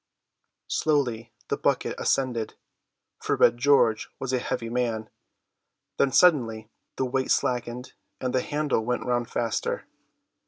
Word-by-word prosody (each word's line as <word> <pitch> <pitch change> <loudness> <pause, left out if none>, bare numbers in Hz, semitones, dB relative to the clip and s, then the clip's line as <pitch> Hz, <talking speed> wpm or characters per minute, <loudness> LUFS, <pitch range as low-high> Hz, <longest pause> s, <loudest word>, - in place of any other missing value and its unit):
Slowly 120 -7 0 0.2
the - - 0
bucket - - 0
ascended, 120 -4 0 0.7
for - - 0
Red 120 +1 +4
George 120 -5 +3
was 130 -1 -4
a 130 - +2
heavy 115 - -3
man; 115 -2 -2 0.9
then 135 - +3
suddenly 115 -11 +3 0.2
the 130 - 0
weight 130 +1 -1
slackened, 125 0 -1 0.3
and 130 -1 -2
the 130 - +2
handle 145 -5 -1
went 125 +2 -2
round 120 -1 0
faster. 115 -2 -2
125 Hz, 125 wpm, -26 LUFS, 115-130 Hz, 0.9 s, Red